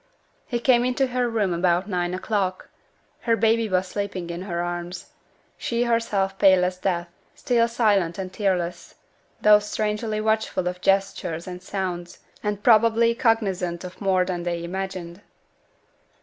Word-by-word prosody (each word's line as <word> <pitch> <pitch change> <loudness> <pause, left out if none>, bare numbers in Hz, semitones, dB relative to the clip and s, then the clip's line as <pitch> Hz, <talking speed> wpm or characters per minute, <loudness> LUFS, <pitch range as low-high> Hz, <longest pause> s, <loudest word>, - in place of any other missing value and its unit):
He 240 - -1
came 240 0 +4
into 255 +2 +1
her 250 -1 -1
room 210 -5 0
about 175 +2 +1
nine 180 -2 -1
o'clock; 190 -1 -2 0.5
her 230 -2 +1
baby 225 0 +2
was 185 0 +1
sleeping 185 -3 -4
in 170 +1 -5
her 175 -3 -4
arms; 175 0 -5 0.5
she 235 0 0
herself 210 -5 0
pale 190 -2 +6
as 180 0 -2
death, 175 -2 -1 0.3
still 235 -2 +2
silent 205 -8 +1
and 185 -1 -5
tearless, 180 -4 -2 0.5
though 210 0 +7
strangely 215 +1 -2
watchful 220 -4 0
of 180 0 -4
gestures 195 -4 0
and 180 -1 -7
sounds, 180 -2 -4 0.2
and 205 -1 -3
probably 230 0 +5
cognizant 195 -8 0
of 180 +3 -9
more 190 -2 +2
than 180 -1 -3
they 170 -1 -3
imagined. 185 0 -5
195 Hz, 145 wpm, -24 LUFS, 180-220 Hz, 0.5 s, though